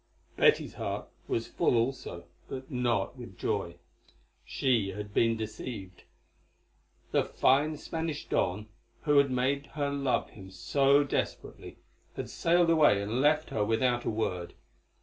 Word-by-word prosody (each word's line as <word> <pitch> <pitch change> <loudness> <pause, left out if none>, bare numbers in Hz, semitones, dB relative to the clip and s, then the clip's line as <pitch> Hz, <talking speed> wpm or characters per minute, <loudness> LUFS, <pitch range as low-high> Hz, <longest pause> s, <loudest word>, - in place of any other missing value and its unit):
Betty's - - +3
heart - - -4 0.2
was 115 - -1
full - - +1
also, 115 -7 -1 0.3
but 130 +2 -7
not 120 -6 0
with - - -10
joy. - - -2 0.7
She 115 -8 0
had 105 +1 -7
been 115 0 +3
deceived. 110 -3 -7 1.1
The - - +3
fine 150 +4 +2
Spanish 160 0 -4
Don, 100 +4 0 0.4
who 145 -2 +4
had 140 -1 +3
made 135 +3 0
her 145 -1 0
love 140 -2 0
him 95 -2 -12
so 135 +11 +3
desperately, 140 - -4 0.4
had - - -5
sailed 170 0 +3
away 150 -11 +5
and 105 +5 -1
left 155 +2 +2
her 105 - 0
without 120 +3 +1
a - - -1
word. 100 -6 -3
125 Hz, 135 wpm, -30 LUFS, 105-140 Hz, 1.1 s, away